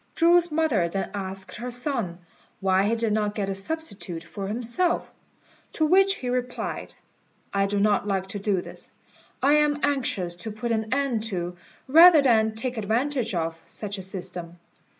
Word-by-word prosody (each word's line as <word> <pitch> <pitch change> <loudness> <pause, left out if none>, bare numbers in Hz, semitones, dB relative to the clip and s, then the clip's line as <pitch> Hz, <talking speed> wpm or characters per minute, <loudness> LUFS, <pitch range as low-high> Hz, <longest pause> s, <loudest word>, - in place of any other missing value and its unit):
Chu's 345 0 +4
mother 285 - +1
then 195 +3 -3
asked 190 -1 -6
her 245 +2 -5
son 245 - -2 0.4
why 190 0 +2
he 230 - +1
did 225 -2 0
not 210 -1 0
get 200 -2 -2
a - - -1
substitute 195 - -4
for 195 +4 -6
himself; 240 - 0 0.6
to 315 - +1
which 385 +4 +4
he 255 - -6
replied, 250 0 -3 0.6
"I 200 0 +2
do 205 0 -1
not 205 0 +2
like 195 -2 0
to 205 - -4
do 195 -2 0
this. - - -8 0.5
I 280 +2 +5
am 295 -1 +2
anxious 230 -11 0
to 220 +5 -4
put 230 +3 -4
an 220 -1 -1
end 265 -4 +1
to, 180 -4 -3 0.3
rather 320 +2 +8
than 220 -4 +3
take 245 +2 -4
advantage 230 +1 0
of, 165 -1 -2
such 205 -2 -4
a - - -5
system. 180 -2 -6
220 Hz, 170 wpm, -25 LUFS, 195-270 Hz, 0.6 s, rather